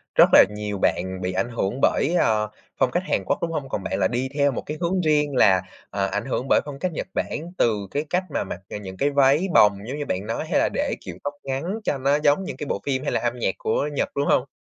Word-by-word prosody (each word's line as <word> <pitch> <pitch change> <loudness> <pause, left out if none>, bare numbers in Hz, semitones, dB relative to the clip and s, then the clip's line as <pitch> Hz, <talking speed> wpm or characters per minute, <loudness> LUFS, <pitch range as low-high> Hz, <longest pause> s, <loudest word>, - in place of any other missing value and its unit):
rất - - +7
là - - +10
nhiều 105 -1 -4
bạn 95 0 0
bị 90 0 -2
ảnh 95 +6 -1
hưởng 115 +1 -2
bởi, 160 - +2
ờ, 105 -1 +2 0.3
phong 125 - +3
cách 175 +7 0
Hàn - - 0
Quốc, - - +1
đúng 165 - -1
hông? 145 -4 -4
Còn 100 - -3
bạn 95 +1 -2
là 95 - +3
đi 125 +4 -2
theo 140 -1 +2
một - - -4
cái 150 +1 -5
hướng 180 +2 +1
riêng 150 -3 +2
là, 95 -7 +5 0.3
ờ, 100 0 -1
ảnh - - -2
hưởng 130 -1 -2
bởi - - +5
phong 140 -2 -7
cách 185 - -1
Nhật 155 - -4
Bản 165 +3 -3
từ 105 -4 +1
cái 145 +2 -1
cách 180 +1 +1
mà - - 0
mặc 90 - -6 0.2
những 95 -1 -8
cái 140 +6 +2
váy 140 +5 +3
bồng, 105 -2 +6
giống 135 - -4
như 145 - -3
bạn 95 +2 -2
nói 115 - -2
hay - - +3
là - - +2
để - - -1
kiểu 90 -3 -8
tóc 145 - -3
ngắn 135 +1 -3 0.2
cho 145 - 0
nó 140 +2 +2
giống 150 +5 +3
những - - -6
cái 150 - -5
bộ - - -2
phim 130 -1 -1
hay - - -1
là - - +1
âm 120 0 -2
nhạc 95 - 0
của 145 +6 0
Nhật, - - 0
đúng 140 0 0
hông? 135 +2 +2
130 Hz, 275 wpm, -24 LUFS, 105-145 Hz, 0.3 s, là